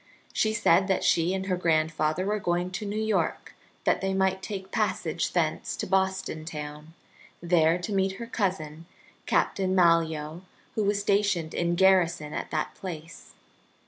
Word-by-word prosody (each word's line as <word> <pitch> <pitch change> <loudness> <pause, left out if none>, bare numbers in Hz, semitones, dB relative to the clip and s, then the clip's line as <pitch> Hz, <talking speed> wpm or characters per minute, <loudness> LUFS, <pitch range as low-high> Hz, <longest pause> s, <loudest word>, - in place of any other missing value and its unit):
She 215 - +2
said 190 -4 +3
that 190 - +1
she 170 +1 +3
and 190 0 -2
her 185 -1 0
grandfather 155 0 +1
were 210 +1 0
going 175 -1 -1
to 205 +3 -4
New 205 - -3
York 220 -1 -1 0.3
that - - +2
they 195 0 -1
might 190 0 +1
take 190 -1 -6
passage - - -1
thence - - 0
to - - -4
Boston 190 -4 0
town, 150 0 -8 0.4
there 170 -1 +3
to 180 +4 -4
meet 190 0 +1
her 235 +5 -7
cousin 170 -8 -3 0.4
Captain 190 -1 +1
Malyoe, 165 -2 +2 0.3
who 215 - 0
was 200 0 +1
stationed 200 -5 +1
in 175 0 0
garrison 175 -5 +3
at - - -4
that 155 -1 -2
place. 165 -3 -9
180 Hz, 155 wpm, -27 LUFS, 160-195 Hz, 0.4 s, said